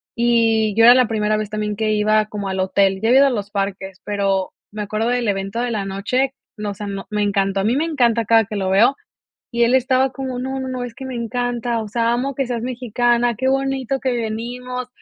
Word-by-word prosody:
y 225 -3 +2
yo 225 - +4
era 240 +2 +9
la 250 -3 +4
primera 215 -1 0
vez 215 -1 -3
también 210 0 -3
que 215 0 0
iba 215 0 +2
como 205 -2 -5
al 190 0 -3
hotel. 190 0 +2
Ya 225 - 0
había 260 +2 +6
ido 280 - +6
a - - +3
los 205 -5 -3
parques, 195 -1 -4
pero 195 -2 -1 0.2
me 210 0 -5
acuerdo 215 +2 -2
del 245 -2 0
evento 195 +4 -2
de 245 -1 -1
la 205 -3 -2
noche, 250 +8 -1 0.2
no, 210 -1 -3
o - - -5
sea, 205 +1 -7
no, 195 -1 -6
me 210 -1 -1
encantó, 195 -1 0
a - - -2
mí 225 +5 +1
me 315 - +1
encanta 235 -8 +1
cada 225 +1 +5
que 215 - -7
lo 190 -1 -1
veo 225 +8 +4 0.6
y 235 -1 0
él 240 +2 +2
estaba 260 0 +3
como: 260 -2 -5
"No, 265 +1 -3
no, 260 - -4
no, 250 -1 -4
es 235 -1 -8
que 265 - -9
me 260 - -5
encanta, 240 0 -2
o 215 - -7
sea, 230 +2 +1
amo 265 +3 -1
que 270 -1 -1
seas 235 -2 -3
mexicana, 240 -1 0
qué 260 +2 0
bonito 270 -1 -1
que 260 -1 0
venimos". 245 +2 -4
230 Hz, 245 wpm, -20 LUFS, 210-250 Hz, 0.6 s, era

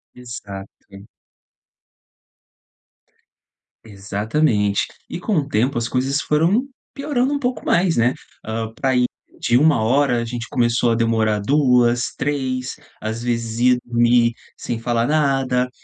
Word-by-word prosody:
Exato. 100 -4 -10 2.8
Exatamente, 105 +1 0 0.2
e 175 - -6
com 205 -1 -1
o 145 -2 0
tempo, 125 +2 +1
as 115 - -1
coisas 135 +3 0
foram 175 - +2 0.3
piorando 275 -1 -1
um 285 - 0
pouco 250 -2 -3
mais, 175 -3 +2
né. 120 +2 +3 0.3
Ah, 110 0 -3
para 130 +1 0
ir 125 0 +3 0.3
de 120 - +2
1h, 130 -2 +3
a - - -2
gente 120 0 -5
começou 120 -1 +1
a - - +3
demorar 110 -2 +1
2, 125 -1 +2
3, 130 -2 -2 0.3
às 110 +2 -4
vezes 115 -1 -2
ia 125 0 +4
dormir 120 0 +3 0.2
sem 115 -1 -4
falar 115 0 0
nada. 135 -4 +1
125 Hz, 125 wpm, -20 LUFS, 115-140 Hz, 2.8 s, ia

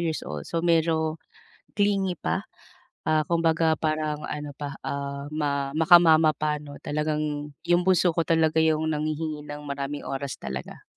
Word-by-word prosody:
years 165 -2 -2
old, 75 -1 -6
so 165 0 -2
medyo 160 -1 +2 0.6
clingy 195 -3 +1
pa, 80 - -1 0.7
ah, 155 -1 +3
kumbaga 165 -1 +2
parang 155 -1 -1
ano 150 0 -5
pa, 145 -2 -5
ah, 140 0 -4
ma 140 -2 -1
maka 165 +4 +6
mama 160 -2 +5
pa 150 0 -1
'no 145 -1 -11
talagang 150 -1 -2
'yung 175 +1 +2
bunso 185 -1 +4
ko 165 0 -1
talaga 160 -1 +2
'yung 160 0 +2
nanghihingi 155 0 -3
ng 145 0 -7
maraming 140 0 -4
oras 135 -2 -4
talaga. 65 0 -7
155 Hz, 155 wpm, -26 LUFS, 145-160 Hz, 0.7 s, maka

